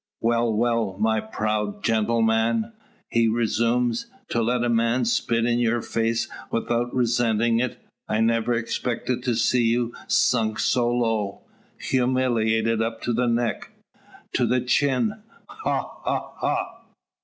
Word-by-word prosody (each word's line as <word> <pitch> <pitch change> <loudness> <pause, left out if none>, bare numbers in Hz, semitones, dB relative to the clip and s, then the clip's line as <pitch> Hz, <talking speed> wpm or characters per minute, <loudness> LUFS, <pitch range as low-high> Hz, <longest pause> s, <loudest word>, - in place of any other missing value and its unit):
"Well, 115 0 +1
well, 115 -3 0
my 110 0 +2
proud 105 -1 -2
gentleman;" 115 - +1 0.3
he 115 -1 +2
resumes, 115 - +1 0.2
"to 115 - 0
let 120 +1 +1
a - - +1
man 115 +1 +2
spit 115 0 +1
in 120 0 +1
your 120 -1 +1
face 115 0 0 0.2
without 120 +1 -1
resentin' 120 -2 +2
it! 125 0 -2 0.3
I 110 - 0
never 115 +1 +2
expected 120 +2 -2
to 120 -2 0
see 120 +2 +2
you 120 +1 +1
sunk 110 -3 +2
so 120 -1 +2
low. 115 -5 -1 0.3
Humiliated 115 -3 +1
up 115 0 -3
to 120 - 0
the 120 +2 +1
neck 120 0 -1 0.6
to - - +2
the 125 0 +2
chin! 140 - +1 0.3
Ha! 435 - -3
ha! - - -2
ha!" - - -2
115 Hz, 130 wpm, -24 LUFS, 115-120 Hz, 0.6 s, my